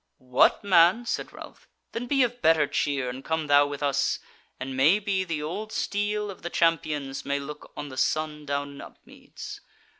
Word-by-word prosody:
"What, 125 - +5
man!" 190 +4 +5
said - - -3
Ralph, - - -12 0.2
"then 240 +2 -4
be 275 0 +3
of 245 0 -2
better 160 -2 +5
cheer, 140 -2 -1
and 130 +2 -6
come 160 0 -1
thou 145 0 +5
with 145 0 -5
us, 140 -1 +1 0.4
and 130 0 -5
may 150 +9 +5
be 200 -2 -1
the 165 -5 -3
old 210 +8 -4
steel 205 0 -1
of 190 - -13
the 175 - -4
champions 150 -5 0
may 140 0 -1
look 150 +1 -9
on 145 - -5
the 130 - -10
sun 150 +1 -1
down 140 0 -2
in 140 - -10
Upmeads. - - -11
155 Hz, 185 wpm, -26 LUFS, 140-195 Hz, 0.4 s, What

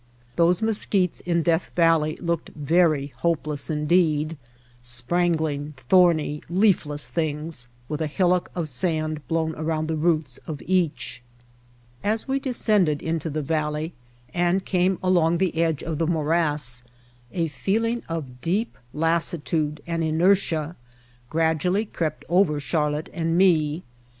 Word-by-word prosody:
Those 175 +4 +3
mesquites 200 -4 +1
in 170 -1 +2
Death 165 +1 +1
Valley 165 -3 +3
looked 170 -2 -2
very 150 -2 +2
hopeless 155 -2 -1
indeed, 155 0 +2 0.5
sprangling, 150 +4 -1
thorny, 155 +2 +3
leafless 170 -6 +2
things 155 -4 -3 0.2
with 150 +1 -4
a 155 - 0
hillock 180 +3 +1
of 170 -3 -2
sand 155 +2 -1
blown 160 -1 0
around 155 0 -2
the 160 - -1
roots 155 -5 +1
of 150 -3 -5
each. 165 -9 0 0.8
As 220 +2 0
we 270 +1 0
descended 210 - +2
into 160 0 -2
the 155 0 -3
valley 155 +2 -1 0.4
and 175 +2 +1
came 185 0 +1
along 175 -2 +3
the 185 -2 0
edge 160 -3 0
of 160 -3 -3
the 165 - +1
morass 150 -6 +1 0.5
a 170 -2 0
feeling 230 +8 -1
of 135 -7 -5
deep 205 +8 -1 0.2
lassitude 160 -1 0
and 165 -1 -2
inertia 165 -1 +2 0.5
gradually 165 +6 +1
crept 160 -6 -3
over 170 -4 +3
Char 150 +1 0
lotte 150 +1 -4
and 165 0 0
me. 165 -4 +3
165 Hz, 130 wpm, -24 LUFS, 150-175 Hz, 0.8 s, Those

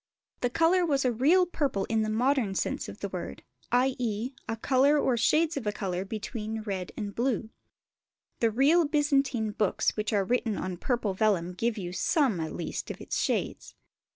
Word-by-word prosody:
The 245 - 0
colour 335 +7 +3
was 280 -5 +1
a 250 - +3
real 305 +11 +4
purple 280 - -1
in 225 -1 0
the 215 - -1
modern 235 -2 +1
sense - - -2
of - - -11
the - - -3
word, - - -6 0.3
i.e. 245 -2 0 0.2
a 225 - -2
colour 275 +5 +3
or 265 -3 +2
shades 310 +7 +2
of 240 -6 -4
a - - +2
colour 190 -3 -3
between 220 +1 -5
red 190 -4 -4
and 205 -2 -4
blue. 235 -2 -1 0.9
The 230 - +3
real 285 +8 +4
Byzantine 275 -7 +1
books 210 -1 0
which 215 +1 -2
are 200 -3 +2
written 230 -1 0
on 185 -1 -4
purple 230 -1 -1
vellum 185 -4 +1
give 230 +5 -1
you 180 -3 -5
some, 250 - +1
at 160 -1 -4
least, 170 - -4
of - - -6
its - - -3
shades. - - -2
230 Hz, 180 wpm, -28 LUFS, 210-275 Hz, 0.9 s, real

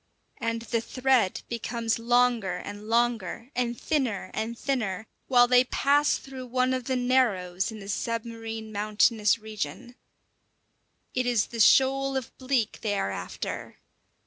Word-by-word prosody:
And 230 -2 -2
the 230 0 -1
thread 250 -4 +1
becomes 235 -1 -2
longer 235 -5 +2
and 205 +3 -8
longer, 230 0 0
and 240 -2 -1
thinner 260 -10 -1
and 230 +2 -3
thinner, 220 -8 -2 0.2
while 245 -2 +6
they 250 0 +5
pass 285 +3 +2
through 260 -2 -9
one 255 +1 +1
of 255 -2 -2
the 260 - 0
narrows 225 -8 +1
in 220 - -8
the 200 - -10
submarine 225 0 -4
mountainous 210 +1 +2
region. 220 +3 -6 1.2
It 255 -1 0
is 240 -4 +2
the 230 - -4
shoal 270 +4 +4
of 255 -3 -6
bleak 255 -4 0
they 205 -2 -1
are 100 - -1
after. 90 -2 -6
235 Hz, 140 wpm, -27 LUFS, 215-255 Hz, 1.2 s, while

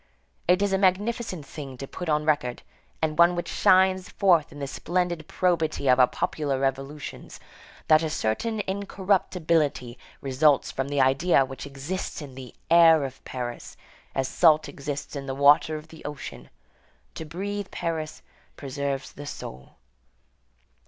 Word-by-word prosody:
It 180 +3 +4
is 200 -1 +1
a 190 - +2
magnificent 195 - 0
thing 140 -3 -8
to 135 - -7
put 180 +3 -6
on 150 0 +1
record, 145 -6 0 0.4
and 155 0 -1
one 170 +1 +6
which 175 - -3
shines 185 0 +3
forth 175 -6 +3
in 145 - -11
the 140 - -4
splendid 175 +2 -2
probity 165 -6 0
of 130 0 +5
our 125 - +7
popular 140 -1 -2
revolutions, 135 +2 -4 0.5
that 155 0 +6
a 160 - -1
certain 210 - -1
incorruptibility 180 -9 0 0.2
results 140 +2 +2
from 135 0 -3
the 145 -1 +1
idea 135 +2 +3
which 135 +1 -8
exists 140 +7 -5
in 145 -4 -9
the 130 -2 -10 0.2
air 165 -3 +7
of 135 -1 -7
Paris, 120 -2 -6 0.4
as 135 -1 0
salt 155 +2 +4
exists 145 +1 -6
in 140 -1 -5
the 135 - -3
water 145 +3 +5
of 155 +1 -8
the 160 - -13
ocean. 135 - -8 0.6
To - - -6
breathe 195 +5 -5
Paris 160 -2 -4 0.3
preserves 140 0 -4
the 145 0 -9
soul. 65 - -9
150 Hz, 150 wpm, -26 LUFS, 135-175 Hz, 0.6 s, our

